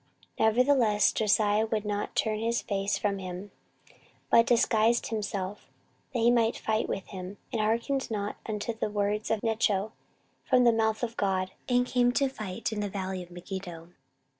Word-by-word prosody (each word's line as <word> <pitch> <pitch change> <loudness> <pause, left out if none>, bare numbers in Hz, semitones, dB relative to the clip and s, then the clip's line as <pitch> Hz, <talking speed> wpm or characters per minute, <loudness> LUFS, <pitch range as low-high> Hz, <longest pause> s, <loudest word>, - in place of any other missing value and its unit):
14:035:022 - - +4
Nevertheless 235 -3 +3
Josiah 215 0 +2
would 215 -1 -2
not 205 0 -3
turn 215 -1 0
his 230 +2 0
face 200 0 -1
from 200 -2 -1
him, 185 +2 -7 0.8
but 230 0 +6
disguised 230 -1 +3
himself, 205 -2 -4 0.4
that 240 - -1
he 235 +1 +5
might 230 -1 +2
fight 220 0 -1
with 195 - -3
him, 190 0 -7 0.2
and 225 - +1
hearkened 235 +5 0
not 205 -2 -3
unto 215 +1 -2
the 220 - -2
words 205 +1 -1
of 220 -2 0
Necho 220 -2 +1 0.5
from 250 -1 +4
the 235 -1 +5
mouth 220 0 0
of 230 -1 -2
God, 190 -2 0 0.2
and 245 0 +3
came 245 -1 +2
to 275 +1 +2
fight 215 -3 -4
in 215 - -3
the 205 -1 -2
valley 190 -1 -4
of 175 - -11
Megiddo. 175 -1 -7
215 Hz, 170 wpm, -28 LUFS, 200-230 Hz, 0.8 s, but